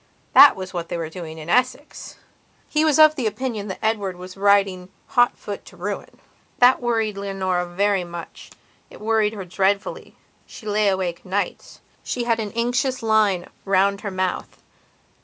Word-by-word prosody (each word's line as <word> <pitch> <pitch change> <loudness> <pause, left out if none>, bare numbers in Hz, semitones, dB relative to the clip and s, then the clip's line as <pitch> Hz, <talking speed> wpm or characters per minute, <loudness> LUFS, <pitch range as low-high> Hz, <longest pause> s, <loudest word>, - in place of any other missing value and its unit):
That 285 - +9
was 190 0 -7
what 170 -1 -4
they - - -3
were 160 -1 -5
doing 160 -2 -8
in 155 0 -9
Essex. 255 - -1 0.5
He 305 0 +1
was 310 -2 +3
of 310 -1 +7
opinion 225 -2 -3
that 190 - -5
Edward 205 -4 -1
was 185 +1 -10
riding 195 -2 +2 0.2
hotfoot 245 -5 +1
to 180 - -15
ruin. 200 +3 -6 0.4
That 250 +1 +5
worried 225 -4 -1
Leonora 190 -3 -2
very 195 +2 +1
muchit 175 -1 -9 0.5
worried 220 -1 +1
her 200 -3 -7
dreadfully; 195 +3 -1 0.3
she 220 - -12
lay 210 0 +1
awake 185 -3 -1
nights; 195 +2 -4 0.2
she 245 - -3
had 230 -1 +1
an 210 -2 -3
anxious 245 +2 0
line 210 -5 +2 0.2
round 195 0 +2
her 205 - -4
mouth. 185 -1 -3
200 Hz, 155 wpm, -22 LUFS, 185-225 Hz, 0.5 s, That